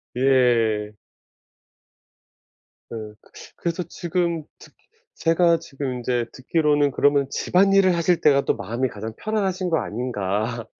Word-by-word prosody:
예. 120 -5 +2 2.0
어 110 -2 -7 0.4
그래서 170 +1 -2
지금 170 -1 -2
듣 - - -17 0.4
제가 165 0 +3
지금 135 -2 -5
인제 120 -1 -1
듣기로는 145 +1 +1
'그러면 140 +1 +2
집안일을 190 +3 +3
하실 170 0 +1
때가 140 -2 +4
또 - - +1
마음이 115 +6 -2
가장 110 -1 -7
편안하신 195 -4 -2
거 165 - +2
아닌가?' 110 0 -3
140 Hz, 240 characters per minute, -23 LUFS, 120-170 Hz, 2.0 s, 때가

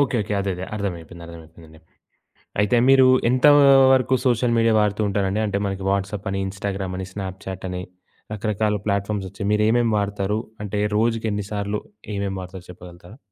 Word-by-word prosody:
Okay. 135 -3 +1
Okay. 105 - -5
అదే 100 0 -2
అదే 90 +1 -6
అర్థమైపోయింది 85 -4 -6
అర్థమైపోయింది. 80 -1 -14 0.8
అయితే 105 +4 +2
మీరు 135 -1 +7 0.2
ఎంత 130 +2 +2 0.5
వరకు 130 -1 +2
సోషల్ 120 -1 +2
మీడియా 115 0 +3
వాడుతూంటారండి 105 -1 0
అంటే, 100 -1 -1
మనకి 95 -1 -4
వాట్సాప్ 100 +1 -2
అని, 95 0 -2
ఇన్‌స్టా‌గ్రామ్ 95 -1 -4
అని, 95 - -4
స్నాప్‌చాట్ 95 -1 -6
అని 90 0 -4 0.5
రకరకాల 105 0 -1
ప్లాట్‌ఫారమ్స్ 100 -1 -1
వచ్చాయి 100 +1 -5
మీరు 105 0 +2
ఏమేమి 115 -1 +2
వాడతారు 100 0 -1 0.2
అంటే, 105 0 -3 0.2
రోజుకి 115 +1 +1
ఎన్ని 105 -1 -3
సార్లు 100 0 -2 0.4
ఏమేమి 100 -1 -2
వాడతారో 90 0 -10
చెప్పగలుగుతారా? 90 +4 -13
100 Hz, 155 wpm, -22 LUFS, 95-105 Hz, 0.8 s, మీరు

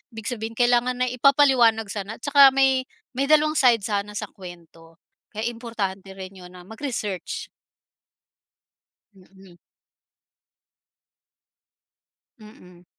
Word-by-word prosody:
ibig 225 +2 -4
sabihin 225 -1 -6
kailangan 245 +1 +2
na 250 - -1
ipapaliwanag 250 -5 +3
sana. 205 +1 -6
Tsaka 280 +3 +6
may 265 -1 +2 0.2
may 270 +2 -2
dalawang 305 0 +4
side 235 -5 +4
sana 205 0 -3
sa - - -5
kwento. 165 -3 -14 0.3
Kaya 215 - -7
importante 215 -5 -5
rin 190 0 -9
‘yon 180 0 -13
na 180 - -12
mag-research. 220 -3 -5 1.6
Mm. 190 -1 -19 2.8
Mm. 180 -5 -17
220 Hz, 100 wpm, -23 LUFS, 190-250 Hz, 2.8 s, Tsaka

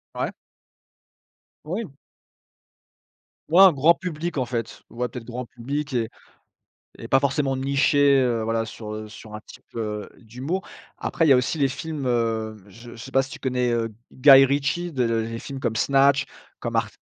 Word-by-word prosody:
Ouais. - - -2 1.3
Oui. 185 +3 -4 1.6
Ouais 175 +4 +6
un 190 -3 +9
grand 150 +5 +5
public 170 -2 -4
en 130 - +1
fait. 115 -2 -4
Ouais 125 +1 -3
peut-être 120 0 -8
grand 125 +2 -5
public 140 +5 -5
et 115 -3 0 0.9
et - - -7
pas 135 - +4
forcément 135 0 0
niché, 140 +1 +3
heu, 120 -2 0
voilà 115 0 -1
sur, 110 -1 -8
heu, 110 0 -7
sur 105 0 -11
un - - -6
type, - - -14
heu, 105 -2 -4
d'humour. 130 - -5 0.3
Après 165 - 0
il - - +4
y - - +6
a - - +6
aussi 125 +6 0
les 140 - +4
films, 150 +1 -5
heu, 115 -2 -1
je 115 +5 -13
je - - -11
sais 125 +3 -10
pas 135 - +4
si 135 - -7
tu 155 - -8
connais, 125 -2 0
heu, 115 -1 -1 0.2
Guy 135 0 +8
Ritchie, 145 +6 -1
les 115 -2 -1
films 135 +2 -7
comme 115 -4 -2
Snatch 140 +3 +3 0.3
comme - - -4
ar - - +2
130 Hz, 175 wpm, -24 LUFS, 115-145 Hz, 1.6 s, un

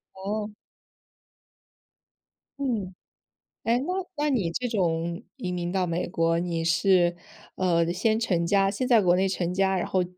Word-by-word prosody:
哦。 210 +2 -3 2.1
嗯。 225 -9 -2 0.7
诶， 230 +1 +2
那 285 +9 -2 0.2
那 295 0 +1
你 205 -11 +1
这 250 +7 -2
种 170 -3 -1 0.2
移 185 -8 -4
民 175 -1 -3
到 185 -1 +1
美 170 +1 -2
国， 165 -1 +1
你 170 -1 -2
是， 175 0 +3 0.4
呃， 170 -2 +1
先 220 +4 +1
成 180 -7 +1
家 195 +1 +3
先 230 +5 -2
在 235 -4 +5
国 175 0 +4
内 190 +1 +2
成 180 -2 -2
家， 190 0 +2
然 180 - -1
后 185 -1 +1
185 Hz, 160 characters per minute, -26 LUFS, 175-215 Hz, 2.1 s, 在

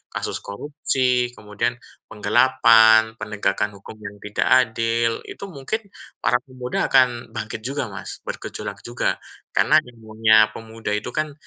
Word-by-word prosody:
kasus - - -2
korupsi, 125 +1 0
kemudian 105 +3 -2 0.4
penggelapan, 110 0 +5
penegakan 105 0 -1
hukum 100 +2 -12
yang 100 0 -7
tidak 105 0 -1 0.2
adil. 115 +1 0
Itu 200 - -8
mungkin 200 +9 -4 0.3
para 125 - +3
pemuda 130 -2 -3
akan 125 -3 +3
bangkit 110 0 -4
juga, 135 -2 -2
Mas, 95 -2 -7
bergejolak - - -6
juga 120 0 -1 0.4
karena 155 - +4
imunnya 110 -2 +3
pemuda 110 -1 -6
itu, 105 - -4
kan, 155 -1 -1
115 Hz, 125 wpm, -22 LUFS, 110-130 Hz, 0.4 s, penggelapan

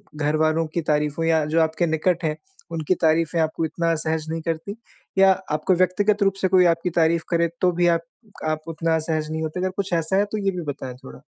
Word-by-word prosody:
घर 150 0 0
वालों 155 +1 +2
की 165 +2 -3
तारीफ़ों 150 +1 0
या 160 -2 +3
जो 160 +2 +2
आपके 160 +2 +1
निकट 165 +3 0
हैं 155 -1 -1 0.3
उनकी 165 +2 0
तारीफ़ें 165 +1 +2
आपको 160 +1 -1
इतना 165 +1 -1
असहज 160 0 -1
नहीं 165 0 -3
करती? 165 +5 -4 0.4
या 195 0 +7 0.2
आपको 155 +5 +1
व्यक्तिगत 200 +4 +2
रूप 195 - +3
से 190 - +3
कोई 185 -1 +5
आपकी 170 +1 +2
तारीफ़ 165 0 +3
करे 170 -1 +2
तो 180 - +4
भी 175 0 +1
आप 170 -1 +3 0.5
आप 155 0 -1
उतना 165 0 0
असहज 155 -1 -2
नहीं 160 0 -3
होते, 160 +3 -3
अगर 185 - 0
कुछ 190 -1 -4
ऐसा 165 +2 0
है 205 - +3
तो 215 - -2
ये 195 -1 0
भी 180 -2 -5
बताएँ 130 -3 -7
थोड़ा? 65 0 -11
165 Hz, 220 wpm, -23 LUFS, 155-180 Hz, 0.5 s, या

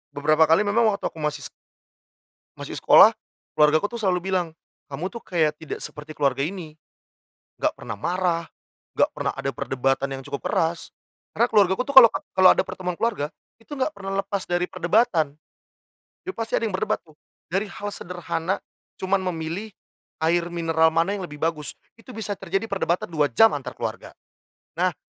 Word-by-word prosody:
beberapa 155 +2 +3
kali 165 +6 +4
memang 220 +3 +3
waktu - - -4
aku 160 - -12
masih 150 -2 -2 1.1
masih - - -7
sekolah - - +7 0.4
keluargaku 155 +4 +4
tuh - - -6
selalu 185 -1 0
bilang, 180 -2 +1 0.4
"Kamu 180 - -3
tuh 230 +4 -9
kayak 155 -4 +1
tidak 160 - -6
seperti 150 +1 -8
keluarga 135 -2 +1
ini, 165 -2 -5 0.9
enggak - - +2
pernah - - -7
marah, 175 -2 0 0.5
enggak - - +4
pernah - - -1
ada 135 - -3
perdebatan 135 +2 -1
yang - - -8
cukup 140 0 -5
keras." 165 +1 -1 0.4
Karena 235 +3 +2
keluargaku 200 -1 +3
tuh 280 - -5
kalau 235 -3 +12 0.3
kalau 185 0 +8
ada - - +1
pertemuan 180 -1 -4
keluarga, 205 -11 -1 0.3
itu 230 +6 -12
enggak 270 +4 -1
pernah 195 -3 -3
lepas 195 -1 -3
dari 175 0 0
perdebatan. 180 -4 +1 0.9
Jadi 375 - -4
pasti 225 0 -5
ada - - 0
yang 210 -4 -1
berdebat 185 - -1
tuh. 155 -2 -21 0.4
Dari 195 +4 0
hal 205 +1 -6
sederhana, 175 -1 -3 0.4
cuma 190 +1 0
memilih 180 +2 -4 0.6
air 170 +1 +2
mineral 165 -2 +2
mana 165 +4 +2
yang 185 -3 -5
lebih 150 - -10
bagus, 155 -3 -2 0.2
itu 250 +2 -12
bisa 215 -2 -4
terjadi 195 +3 -2
perdebatan 180 -3 -1
2 150 -3 +2
jam 220 - +5
antar - - -5
keluarga. - - -6 0.6
Nah, - - +2
175 Hz, 165 wpm, -24 LUFS, 160-200 Hz, 1.1 s, kalau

